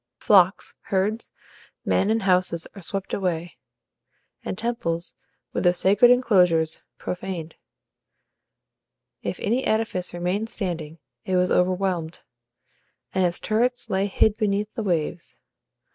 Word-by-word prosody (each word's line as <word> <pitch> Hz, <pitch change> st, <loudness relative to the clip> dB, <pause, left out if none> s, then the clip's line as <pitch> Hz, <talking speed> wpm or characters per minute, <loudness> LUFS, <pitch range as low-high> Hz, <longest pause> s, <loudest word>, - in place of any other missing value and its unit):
Flocks, 190 Hz, -2 st, +4 dB
herds, 205 Hz, +4 st, -1 dB, 0.5 s
men, 200 Hz, -, +2 dB
and 225 Hz, -1 st, +1 dB
houses 180 Hz, -3 st, +2 dB
are 200 Hz, -, -10 dB
swept 195 Hz, +3 st, -4 dB
away, 175 Hz, -3 st, -2 dB, 0.9 s
and -, -, -4 dB
temples, 190 Hz, -7 st, -2 dB, 0.4 s
with -, -, -1 dB
their 175 Hz, -1 st, +5 dB
sacred 200 Hz, +6 st, +5 dB
enclosures, 180 Hz, -10 st, +3 dB, 0.2 s
profaned. 180 Hz, -3 st, -5 dB, 1.7 s
If -, -, -4 dB
any 240 Hz, +5 st, 0 dB
edifice 220 Hz, -5 st, -1 dB
remained 180 Hz, +6 st, -2 dB
standing, 165 Hz, -7 st, -4 dB, 0.3 s
it 185 Hz, -, -1 dB
was 180 Hz, 0 st, +2 dB
overwhelmed, 180 Hz, -2 st, 0 dB, 0.9 s
and 190 Hz, -, +2 dB
its 175 Hz, -1 st, +1 dB
turrets 245 Hz, +3 st, 0 dB
lay 190 Hz, +1 st, +1 dB
hid 210 Hz, +2 st, +2 dB
beneath 210 Hz, -1 st, -1 dB
the 235 Hz, -, -3 dB
waves. 170 Hz, -4 st, -2 dB
190 Hz, 115 wpm, -24 LUFS, 175-210 Hz, 1.7 s, their